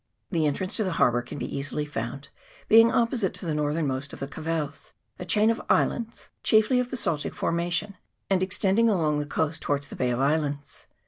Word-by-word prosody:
The 160 -4 +2
entrance 185 +6 -2
to 220 - +2
the 185 -3 -1
harbour 120 -6 +3
can 120 +3 -8
be 125 -2 -5
easily 145 +2 -2
found, 135 0 -5 0.4
being 225 +1 +7
opposite 230 -4 +1
to - - -8
the 160 - -1
northernmost 145 -2 -1
of - - -9
the 135 - -3
Cavelles, 155 -1 -4 0.3
a 180 - -5
chain 210 +5 +3
of 230 - -3
islands 230 -1 0
chiefly 220 +3 +4
of 250 0 -1
basaltic 190 - -1
formation, 175 +4 -1 0.3
and 190 -2 +2
extending 195 +4 +2
along 155 -7 +1
the 145 - -3
coast 160 +1 -1
towards 140 -1 -2
the - - -8
Bay 125 - 0
of 120 0 -1
Islands. 145 0 -1
160 Hz, 190 wpm, -26 LUFS, 145-205 Hz, 0.4 s, being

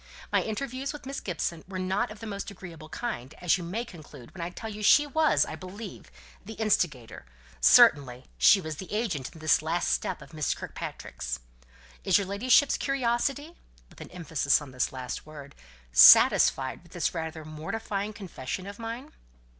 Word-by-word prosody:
My - - +3
interviews 260 +5 -4
with 295 - -10
Miss 275 +1 -5
Gibson 170 -2 -4
were 190 -1 -6
not 190 +6 -1
of 215 0 -10
the - - -6
most 200 -2 -5
agreeable 170 -5 -11
kind 155 - -5
as 180 +1 +1
you - - -6
may 210 +8 -4
conclude 150 - -13
when 185 - -8
I 170 - -3
tell 200 +5 -8
you 210 0 -8
she 295 +8 +6
was, 310 +1 +2
I - - -6
believe, 195 +2 -9 0.3
the 220 +3 -9
instigator 165 - -1 0.4
certainly, 125 - +5
she 65 - +7
was 160 -4 -6
the 190 - -9
agent 200 - -2
in - - -15
this 155 -1 +3
last 165 +3 -1
step - - -1
of - - -17
Miss 155 -3 -1
Kirkpatrick's. - - -6 0.6
Is - - +4
your 200 - -1
ladyship's 250 +9 +3
curiosity" 275 +4 -1 0.4
(with - - -15
an - - -9
emphasis 160 -5 +1
on 145 -3 -10
this 130 -1 -1
last 130 +2 -6
word) 145 -2 -11 0.4
"satisfied 130 - +6
with 175 -1 -19
this 175 - -1
rather 160 -2 -5
mortifying 200 +6 -4
confession 185 - -6
of 200 +2 -9
mine?" 230 +6 -6
185 Hz, 175 wpm, -28 LUFS, 155-225 Hz, 0.6 s, she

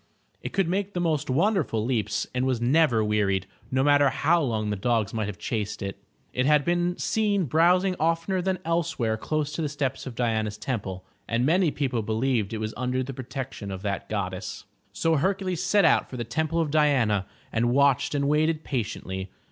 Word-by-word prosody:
It - - -5
could 195 -3 +1
make 195 +3 -1
the - - 0
most 160 -6 0
wonderful 155 - +1
leaps 120 -4 0
and 125 0 0
was 130 -3 0
never 125 -2 +3
wearied, 100 -3 +1 0.2
no 130 +1 +1
matter 145 -1 +5
how 165 +5 +2
long 110 -6 -1
the - - 0
dogs 110 0 0
might 110 -2 -1
have 105 -3 -6
chased 105 -1 -3
it. 100 0 -5 0.3
It 130 +1 +1
had 150 -1 +4
been 175 +1 +1
seen 205 -4 +1
browsing 180 +6 +3
oftener 165 +4 +1
than 190 +1 0
else 165 0 0
where 110 -3 +1
close 150 +5 -2
to 150 - -3
the 150 - -1
steps 140 -2 -3
of 125 - -7
Diana's 110 -3 -1
temple, 100 -6 -4 0.2
and 115 +2 +1
many 175 +3 +3
people 130 -5 -1
be 110 +1 -3
lieved 115 -3 0
it 110 - -3
was 110 0 -3
under 125 +1 -1
the 135 +2 -6
protection 130 -4 -6
of 95 0 -6
that 100 -2 -3
goddess. 95 -3 -4 0.3
So 165 -1 +1
Hercules 185 +1 0
set 205 -3 +3
out 160 - +3
for 130 - -7
the 120 - -2
Temple 160 +7 -1
of 160 -3 0
Diana, 125 -11 +2 0.3
and 120 +1 +2
watched 140 +1 +3
and 140 -1 +1
waited 155 +2 +2
patiently. 95 -6 -4
130 Hz, 195 wpm, -26 LUFS, 110-160 Hz, 0.3 s, matter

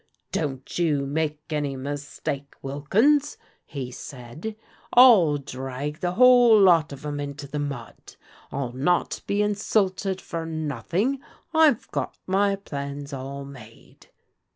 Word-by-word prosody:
' - - -49
Don't 135 0 -3
you 150 -5 +1
make 150 +1 -2
any 145 -3 -1
mistake, 140 0 -5
Wilkins,' 215 - +2 0.3
he 130 -4 -5
said. 135 - -8 0.4
'I'll 210 - +7
drag 135 +2 -5
the 175 0 -1
whole 245 0 +7
lot 170 -6 +5
of 140 +1 -9
'em 145 -1 -3
into 145 0 -5
the 145 +2 -5
mud: 140 -5 -7 0.4
I'll 135 -3 -3
not 155 +7 0
be 205 +1 +1
insulted 200 -2 0
for 165 -3 -5
nothing. 160 - -1 0.3
I've 315 -7 +4
got - - -3
my 200 +1 +2
plans 140 -5 -6
all 135 +1 -6
made.' 120 -5 -14
150 Hz, 130 wpm, -25 LUFS, 140-195 Hz, 0.4 s, I'll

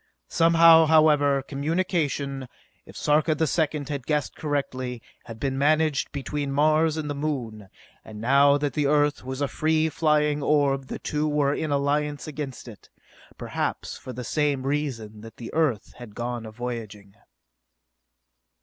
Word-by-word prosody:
Somehow, 165 -1 +6
however, 150 -3 +4
communication, 145 -3 -2 0.4
if - - -12
Sarka 155 +1 +2
the 160 - +1
Second 150 -2 -1
had 140 -4 -5
guessed 150 -3 -1
correctly, 130 -4 -3 0.3
had 115 -1 -10
been 135 0 -2
managed 155 0 +2
between 140 0 -4
Mars 155 +2 +2
and 155 -1 -3
the 145 - -2
Moon; 125 -9 -4 0.3
and 105 -1 -10
now 140 +4 +4
that 145 -1 -2
the 150 -2 0
Earth 145 0 +2
was 130 +2 -5
a 140 - +1
free 155 +2 +1
flying 150 -2 +1
orb 140 -2 +1
the - - -5
two 150 +1 -2
were 145 -2 +1
in 155 +1 -3
alliance 145 +1 0
against 140 -4 -6
it, 110 -4 -13 0.5
perhaps - - -3
for 130 - -9
the 125 0 -6
same 145 0 -1
reason 130 -7 -3
that 115 0 -12
the 115 - -8
Earth 145 -10 0
had 115 -4 -11
gone 120 -1 -4
a - - -9
voyaging. 110 -4 -7
145 Hz, 150 wpm, -25 LUFS, 130-150 Hz, 0.5 s, Somehow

